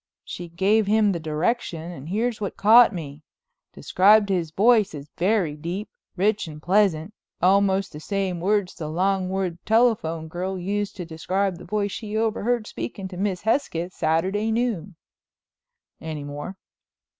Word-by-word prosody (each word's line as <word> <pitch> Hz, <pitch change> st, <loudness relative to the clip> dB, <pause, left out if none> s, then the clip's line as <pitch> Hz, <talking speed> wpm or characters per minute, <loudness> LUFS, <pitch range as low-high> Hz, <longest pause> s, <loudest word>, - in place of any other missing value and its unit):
She 175 Hz, -1 st, -7 dB
gave 195 Hz, +5 st, +2 dB
him 210 Hz, 0 st, +3 dB
the 170 Hz, -, -2 dB
direction 165 Hz, +2 st, -2 dB
and 155 Hz, -2 st, -9 dB
here's 220 Hz, +3 st, -1 dB
what 200 Hz, -, -4 dB
caught 230 Hz, +4 st, +7 dB
me—describes 195 Hz, -, 0 dB
his 175 Hz, -4 st, 0 dB
voice 210 Hz, +1 st, +3 dB
as 145 Hz, +1 st, -10 dB
very 180 Hz, -5 st, +1 dB
deep, 175 Hz, +7 st, -5 dB, 0.3 s
rich 200 Hz, +1 st, +1 dB
and 150 Hz, -1 st, -9 dB
pleasant, 185 Hz, 0 st, +1 dB, 0.3 s
almost 195 Hz, +1 st, +2 dB
the 150 Hz, -, -7 dB
same 190 Hz, 0 st, -2 dB
words 200 Hz, 0 st, +1 dB
the 155 Hz, -, -6 dB
Longwood 185 Hz, +1 st, -1 dB
telephone 215 Hz, -9 st, +2 dB
girl 185 Hz, +4 st, -4 dB
used 200 Hz, +3 st, -2 dB
to 180 Hz, -, -6 dB
describe 185 Hz, +3 st, -2 dB
the -, -, -11 dB
voice 205 Hz, -1 st, -1 dB
she 215 Hz, 0 st, -4 dB
overheard 225 Hz, +1 st, 0 dB
speaking 120 Hz, -, -6 dB
to 180 Hz, -, -9 dB
Miss 190 Hz, -2 st, -1 dB
Hesketh 190 Hz, -, -1 dB
Saturday 190 Hz, +8 st, 0 dB
noon." 220 Hz, -7 st, -1 dB, 1.1 s
"Any 155 Hz, -2 st, -5 dB
more?" 145 Hz, +6 st, -7 dB
190 Hz, 145 wpm, -24 LUFS, 165-210 Hz, 1.1 s, caught